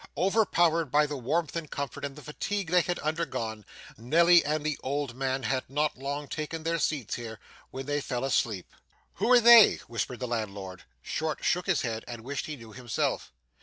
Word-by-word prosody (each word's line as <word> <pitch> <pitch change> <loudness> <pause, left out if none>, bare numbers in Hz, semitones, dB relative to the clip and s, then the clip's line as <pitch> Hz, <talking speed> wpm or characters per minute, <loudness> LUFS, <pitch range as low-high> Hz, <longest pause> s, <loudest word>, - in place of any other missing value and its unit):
Overpowered 175 -5 +3
by 150 +3 +4
the 150 0 -4
warmth 150 +7 -1
and 165 -3 -4
comfort 140 -1 -5
and 140 -1 -4
the 150 - -12
fatigue 180 +6 -3
they 180 0 +5
had 175 +1 -2
undergone, 145 -9 -3 0.4
Nelly 170 +8 +5
and 150 +1 -1
the 155 -2 -1
old 140 -1 -2
man 130 +1 -2
had 130 0 -1
not 150 +2 0
long 140 +2 -4
taken 155 +2 -5
their 165 +1 0
seats 140 -6 -1
here, 115 -2 -6 0.3
when 135 0 -7
they 145 +1 -1
fell 125 -2 -3
asleep. 110 -8 -1 0.4
'Who 245 - +1
are 250 - +8
they?' 235 -1 +9
whispered 120 +1 -3
the 125 - -3
landlord. 100 -5 -5 0.2
Short 155 -1 -3
shook 180 +2 +1
his 190 -6 +2
head, 115 -2 -3
and 120 -2 -7
wished 140 +3 -4
he 155 - -5
knew 115 -4 -13
himself. 125 -3 -2
145 Hz, 190 wpm, -28 LUFS, 125-165 Hz, 0.4 s, they